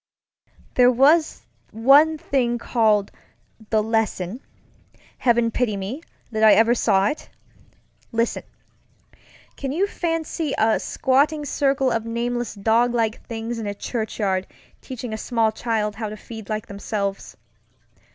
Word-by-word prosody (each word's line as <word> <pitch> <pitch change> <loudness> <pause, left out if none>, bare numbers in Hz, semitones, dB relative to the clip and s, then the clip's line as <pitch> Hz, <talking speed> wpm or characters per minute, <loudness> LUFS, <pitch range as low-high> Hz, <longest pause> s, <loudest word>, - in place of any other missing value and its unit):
There 250 -1 +5
was 295 +6 +3 0.3
one 280 +8 +5
thing 245 -5 0
called 215 -4 +1 0.6
The 215 -1 +2
LessonŌĆöheaven 225 +2 -2
pity 230 -5 0
me, 205 +10 -5 0.3
that 220 -1 -2
I 215 - +8
ever 230 +2 +5
saw 195 -5 +2
it! 300 - -6 0.8
ListenŌĆöcan 230 0 -1 1.3
you 380 +4 +2
fancy 330 -5 -2
a 220 0 +3
squatting 290 +3 +1
circle 275 -1 +1
of 225 -1 -1
nameless 240 0 -2
doglike 225 +2 +1
things 230 0 -4
in 220 - -4
a 205 - -3
churchyard 205 -4 -2 0.3
teaching 245 -3 -7
a 220 - -4
small 225 -2 +1
child 215 -2 -2
how 220 -2 -3
to 215 - -8
feed 220 -1 -10
like 215 -1 -3
themselves? 200 -1 -4
230 Hz, 120 wpm, -22 LUFS, 215-255 Hz, 1.3 s, I